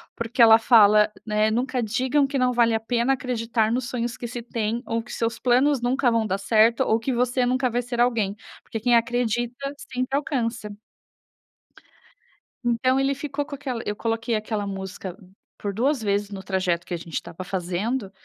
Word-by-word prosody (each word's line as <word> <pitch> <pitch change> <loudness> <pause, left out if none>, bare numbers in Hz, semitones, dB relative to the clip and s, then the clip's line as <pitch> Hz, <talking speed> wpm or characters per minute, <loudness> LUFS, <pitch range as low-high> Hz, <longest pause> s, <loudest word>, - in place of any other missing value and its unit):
porque 230 +1 -1
ela 225 -1 +9
fala, 215 -2 +5
né, 215 0 +1
nunca 250 +1 -1
digam 260 +6 +1
que 275 -1 -2
não 250 0 +2
vale 235 -1 +3
a 220 - +1
pena 240 +3 +1
acreditar 230 -3 -1
nos 245 0 -1
sonhos 240 -1 -3
que - - -6
se 240 0 -6
têm 230 0 -2
ou 230 0 -1
que - - -10
seus 230 0 -2
planos 260 +2 +3
nunca 250 +1 +2
vão 230 -1 +1
dar 195 -1 -1
certo, 225 +4 +3
ou 220 - +3
que 255 +3 -2
você 245 +1 +1
nunca 255 +1 +1
vai 240 +1 -1
ser 240 0 -5
alguém, 220 -5 +1 0.3
porque 225 - -5
quem 240 +2 +3
acredita 240 +3 -1 0.2
sempre 255 +2 -1
alcança 235 -7 -2 1.9
Então 255 +3 +2
ele 270 0 +1
ficou 285 0 -4
com 290 -2 -7
aquela 255 -4 -4
eu 210 - -2
coloquei 225 +1 -1
aquela 215 -1 -3
música 190 -1 -6 0.4
por 200 -1 -4
2 260 +4 +1
vezes 205 0 0
no 195 -1 -7
trajeto 185 -3 -1
que 180 - -6
a - - -1
gente 165 0 -12
estava 185 +2 -5
fazendo, 195 +5 -3
230 Hz, 185 wpm, -24 LUFS, 215-250 Hz, 1.9 s, ela